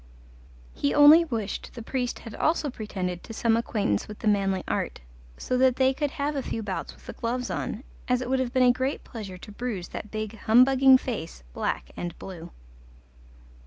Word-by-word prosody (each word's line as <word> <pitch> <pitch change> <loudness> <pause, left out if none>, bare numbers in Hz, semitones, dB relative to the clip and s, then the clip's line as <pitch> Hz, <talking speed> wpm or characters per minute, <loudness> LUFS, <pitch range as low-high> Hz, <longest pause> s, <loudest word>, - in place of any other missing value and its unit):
He 140 - 0
only 305 +3 +8
wished 225 -9 -4
the 235 - -7
priest 250 0 -2
had 225 - -10
also 310 0 0
pretended 185 -6 -4
to 225 - -9
some 230 0 +2
acquaintance 210 - 0
with 210 - -8
the 225 - -4
manly 195 -2 +2
art, - - -2 0.4
so 255 - -1
that 260 -1 +4
they 260 0 +3
could 290 +2 -1
have 290 +1 -2
a 275 - 0
few 225 -3 -4
bouts 195 -2 -4
with - - -20
the - - -7
gloves 245 +2 -3
on, 230 - -3 0.2
as 250 -1 +2
it 250 - -4
would 260 +1 +1
have 255 -2 -1
been 255 -1 +3
a 250 - +7
great 260 +3 -2
pleasure 205 -6 -8
to 210 - -11
bruise 210 -5 -4
that 210 - -7
big 215 0 -5
humbugging 260 +3 +6
face 210 - -6
black - - -3
and 175 -1 -5
blue. 175 -3 -9
235 Hz, 195 wpm, -26 LUFS, 205-260 Hz, 0.4 s, only